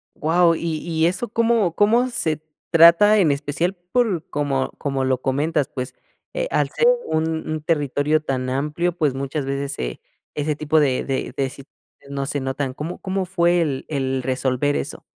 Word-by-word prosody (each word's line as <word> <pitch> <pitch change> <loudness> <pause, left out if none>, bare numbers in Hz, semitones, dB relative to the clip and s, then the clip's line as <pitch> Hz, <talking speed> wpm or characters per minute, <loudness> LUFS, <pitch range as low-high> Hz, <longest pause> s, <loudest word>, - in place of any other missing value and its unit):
Wao, 165 +2 +3
y 165 -1 -2
y 160 0 0
eso, 185 +7 -2
¿cómo 225 -5 +2
cómo 225 +6 +3
se 160 - 0 0.3
trata? 170 +6 +7
En 170 -8 +4
especial 150 +6 -1 0.2
por 220 -10 +1
como 140 -2 -1
como 135 -2 -1
lo 130 -1 +1
comentas 145 +2 0
pues, 125 -1 -5 0.4
eh, - - -1
al - - +1
ser 475 - +2 0.2
un 160 0 -1
un 155 0 -2
territorio 150 -1 +1
tan 130 -3 -2
amplio, 150 +6 -1
pues 150 -6 +1
muchas 140 +1 -3
veces 140 +1 -2
se - - -4 0.4
ese 150 0 -1
tipo 155 +1 +2
de 135 -4 +1
de 135 -1 -3
de 135 -1 0
situaciones 140 +2 -15 0.3
no 140 -1 -2
se 145 - -2
notan. 135 0 -3
¿Cómo 160 +5 -5
cómo 190 0 -2
fue 175 -1 +2
el 140 -5 -2
el 135 -3 -1
resolver 130 +2 0
eso? - - -4
150 Hz, 175 wpm, -22 LUFS, 135-170 Hz, 0.4 s, trata